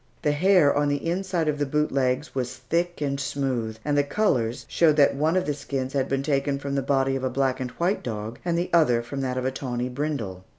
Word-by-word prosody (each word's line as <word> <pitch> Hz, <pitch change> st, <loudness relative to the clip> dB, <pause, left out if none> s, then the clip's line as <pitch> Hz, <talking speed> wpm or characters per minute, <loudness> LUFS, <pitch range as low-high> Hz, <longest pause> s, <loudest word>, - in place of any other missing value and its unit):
The 150 Hz, -, +3 dB
hair 170 Hz, -1 st, +4 dB
on 145 Hz, 0 st, +2 dB
the 145 Hz, +3 st, -1 dB
inside 180 Hz, -2 st, -1 dB
of 150 Hz, -1 st, 0 dB
the 145 Hz, -, +1 dB
boot 150 Hz, +2 st, 0 dB
legs 130 Hz, +2 st, 0 dB
was 130 Hz, -1 st, -3 dB
thick 170 Hz, +7 st, -2 dB
and 140 Hz, -1 st, -1 dB
smooth, 130 Hz, -5 st, -2 dB
and 145 Hz, -1 st, +1 dB
the 145 Hz, -, +4 dB
colors 130 Hz, -, 0 dB
showed 160 Hz, -3 st, +3 dB
that 145 Hz, -2 st, +5 dB
one 155 Hz, +5 st, +1 dB
of 185 Hz, -, +1 dB
the 150 Hz, -, 0 dB
skins 135 Hz, -2 st, -4 dB
had 135 Hz, -1 st, 0 dB
been 135 Hz, 0 st, 0 dB
taken 140 Hz, -1 st, 0 dB
from 140 Hz, 0 st, -4 dB
the 140 Hz, -, +1 dB
body 135 Hz, 0 st, +1 dB
of 135 Hz, -, -3 dB
a 130 Hz, -, +1 dB
black 130 Hz, 0 st, 0 dB
and 130 Hz, -1 st, -3 dB
white 175 Hz, +9 st, -1 dB
dog, 110 Hz, 0 st, -5 dB
and 170 Hz, -1 st, 0 dB
the 175 Hz, +1 st, -2 dB
other 125 Hz, -9 st, +4 dB
from 135 Hz, +3 st, -5 dB
that 130 Hz, -1 st, -2 dB
of 130 Hz, -, -2 dB
a 130 Hz, -, +1 dB
tawny 125 Hz, -2 st, -3 dB
brindle. 125 Hz, -9 st, -3 dB
140 Hz, 245 wpm, -25 LUFS, 130-150 Hz, -, that